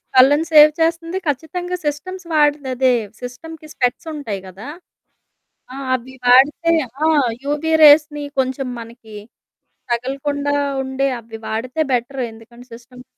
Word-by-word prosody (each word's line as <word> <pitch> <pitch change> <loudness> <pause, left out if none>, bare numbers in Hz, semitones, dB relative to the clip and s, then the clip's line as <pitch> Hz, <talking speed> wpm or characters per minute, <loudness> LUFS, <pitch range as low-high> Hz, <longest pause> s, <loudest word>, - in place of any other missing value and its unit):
కళ్లను 290 +5 +5
save 305 0 +8
చేస్తుంది 330 +2 0
ఖచ్చితంగా. 350 +6 -3
Systems 355 +6 -4
వాడేదదే. 270 -4 +2 0.3
సిస్టమ్‌కి 310 +6 -9
స్పెక్ట్స్ 250 +6 -1
ఉంటాయి 225 -10 -5
కదా. 195 +7 -11 1.1
ఆ! - - -8 0.2
అవి 255 +1 -8
వాడితే 285 +7 +5 0.3
ఆ! - - +4 0.4
యువీ 300 +3 -1
రేస్‌ని 295 0 +6 0.2
కొంచెం 260 0 -1
మనకి 230 -1 -12 0.8
తగలకుండా 285 +4 -2 0.3
ఉండే 265 +1 -1
అవి 225 -1 -11
వాడితే 250 +7 -3
బెటర్. 255 +2 -2
ఎందుకంటే 235 +2 -15
సిస్టమ్ 250 +1 -13
275 Hz, 115 wpm, -19 LUFS, 245-300 Hz, 1.1 s, save